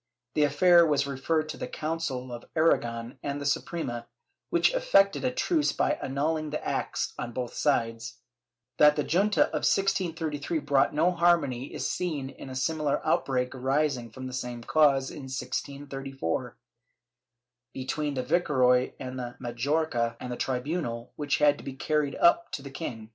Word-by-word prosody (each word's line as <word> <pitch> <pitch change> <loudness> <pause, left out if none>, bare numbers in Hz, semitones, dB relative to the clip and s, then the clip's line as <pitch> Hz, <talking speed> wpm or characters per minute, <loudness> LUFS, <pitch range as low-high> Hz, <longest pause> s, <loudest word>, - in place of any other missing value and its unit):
The 150 - +1
affair 170 +4 +6
was 150 -4 +2
referred 155 +3 -1
to - - -5
the - - -4
Council 150 -6 -3
of 120 - -8
Aragon 120 -6 +1
and 145 0 -3
the 145 - -5
Suprema, 135 -5 -2 0.4
which - - +3
effected - - +3
a 255 - +2
truce 300 +4 +1
by 300 - 0
annulhng 155 +3 -1
the 150 - -4
acts - - -2
on 120 - -4
both 125 -1 -4
sides.^ 115 -4 0 0.6
That 150 0 +7
the 150 - 0
junta 200 +7 +3
of - - -2
1633 165 -6 0
brought 145 -2 +2
no 165 +4 +3
harmony 170 -7 +2
is - - -3
seen 150 -7 -2
in 135 - -10
a 130 - -7
similar 150 +2 0
outbreak 125 -2 +1
arising 135 -1 0
from 130 +4 -9
the 130 - -6
same 125 -1 -4
cause 140 -2 +3
in 140 - -8
1634, 135 - -4 1.1
between 140 +3 -3
the 130 - -1
viceroy 130 -5 +3
of 125 -1 -6
Majorca 120 -1 -1
and 125 - -6
the - - -2
tribunal, 125 -2 -3
which 145 -1 0
had 145 -1 +4
to - - -11
be 135 - -6
carried 145 +1 0
up 170 0 +4
to 140 - -4
the 140 - -8
king. 115 -7 -6
140 Hz, 160 wpm, -28 LUFS, 125-160 Hz, 1.1 s, That